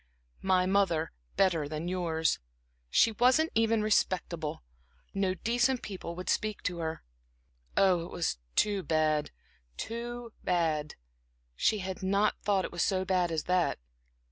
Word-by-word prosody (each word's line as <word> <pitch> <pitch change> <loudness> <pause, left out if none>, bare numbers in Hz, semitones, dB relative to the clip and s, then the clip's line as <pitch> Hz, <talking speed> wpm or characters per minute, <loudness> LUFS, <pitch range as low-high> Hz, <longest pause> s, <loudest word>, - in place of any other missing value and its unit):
"My 185 -1 +3
mother 185 -4 +2 0.2
better 165 -7 +2
than 155 +2 -4
yours 165 -3 0 0.5
she 225 - +4
wasn't 255 +8 +3
even 225 -1 +2
respectable; 170 - 0 0.5
no 195 -2 0
decent 240 +5 +1
people 185 -4 -6
would 180 +1 -7
speak 215 -1 -1
to 175 -2 -2
her"... 160 0 -3 0.7
Oh, 180 -3 +4
it - - -9
was 165 - -1 0.2
too 205 -2 +2
bad 155 -2 +1 0.5
too 235 0 -5
bad; 160 -4 0 0.6
she 215 - +2
had 190 -1 -5
not 200 +2 +2
thought 195 -2 +1
it - - -6
was 175 - -2
so 190 0 +1
bad 180 -2 +1
as 160 -2 -1
that. 180 -1 +1
185 Hz, 140 wpm, -30 LUFS, 165-210 Hz, 0.7 s, she